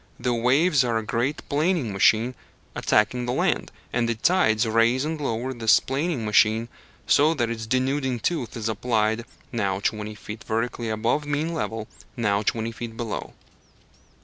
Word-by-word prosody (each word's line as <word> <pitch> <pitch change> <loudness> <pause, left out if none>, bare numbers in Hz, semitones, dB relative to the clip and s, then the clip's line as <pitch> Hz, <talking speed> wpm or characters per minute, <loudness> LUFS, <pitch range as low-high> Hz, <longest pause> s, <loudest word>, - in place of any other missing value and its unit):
The 125 0 0
waves 135 +6 +3
are 120 -2 0
a 110 - -2
great 120 +7 -2
planing 150 - 0
machine 110 +5 +3 0.4
attacking 120 +4 +1
the 125 - 0
land, - - 0 0.2
and 115 -1 +1
the 115 - 0
tides 110 -5 +3
raise 115 +4 +2
and 155 0 -3
lower 130 0 -2
this 115 -3 +4
planing 140 -2 -2
machine, 110 +2 +3 0.4
so 155 +3 +4
that 120 -4 0
its 110 -1 -5
denuding 130 +1 0
tooth 130 -2 -2
is 110 -1 -3
applied, 110 0 0 0.3
now 100 -5 -1
twenty 105 +1 -2
feet 110 +1 -9
vertically 115 +1 -2
above 115 +7 0
mean 150 +3 -1
level, 110 -8 -3 0.3
now 100 -3 +1
twenty 110 +2 -1
feet 115 0 -7
below. 115 -3 -4
115 Hz, 155 wpm, -24 LUFS, 110-130 Hz, 0.4 s, this